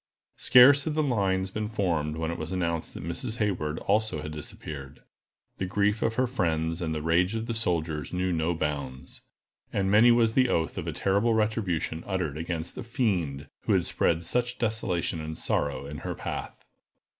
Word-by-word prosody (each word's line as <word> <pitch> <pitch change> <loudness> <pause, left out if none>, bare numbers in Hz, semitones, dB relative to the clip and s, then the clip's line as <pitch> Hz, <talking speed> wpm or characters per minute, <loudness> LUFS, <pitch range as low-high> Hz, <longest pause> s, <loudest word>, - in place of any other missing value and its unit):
Scarce 135 +3 +7
had 155 -2 -1
the 155 - +2
lines 95 -7 0
been 110 +1 -2
formed 85 -8 -1
when 80 0 -2
it 85 - -4
was 80 +2 -5
announced 85 -3 -2
that - - -6
Miss 110 +8 -1
Hayward 90 -9 -1
also 105 -7 0
had 75 - -5
disappeared. 75 -2 -8 0.6
The 95 - -1
grief 105 +3 +1
of 115 - 0
her 130 - +2
friends, 80 -8 -1
and 80 -2 -2
the 75 - -3
rage 90 +5 +2
of 110 0 -2
the 115 - -2
soldiers 85 -8 -1
knew 90 0 0
no 85 +1 0
bounds, 70 -4 -4 0.5
and 95 -1 0
many 110 +4 +7
was 115 -2 +4
the 130 0 +3
oath 80 -1 0
of - - -6
a - - 0
terrible 100 +4 +1
retribution 105 -7 -1
uttered 90 -7 -1
against 85 0 -4
the - - -6
fiend 95 - -1 0.2
who - - +3
had - - +2
spread 85 0 +1
such 120 +7 -1
desolation 100 -8 -1
and 80 0 -5
sorrow 70 -1 -1
in 75 +1 -7
her - - -4
path. - - -6
90 Hz, 185 wpm, -27 LUFS, 80-110 Hz, 0.6 s, Scarce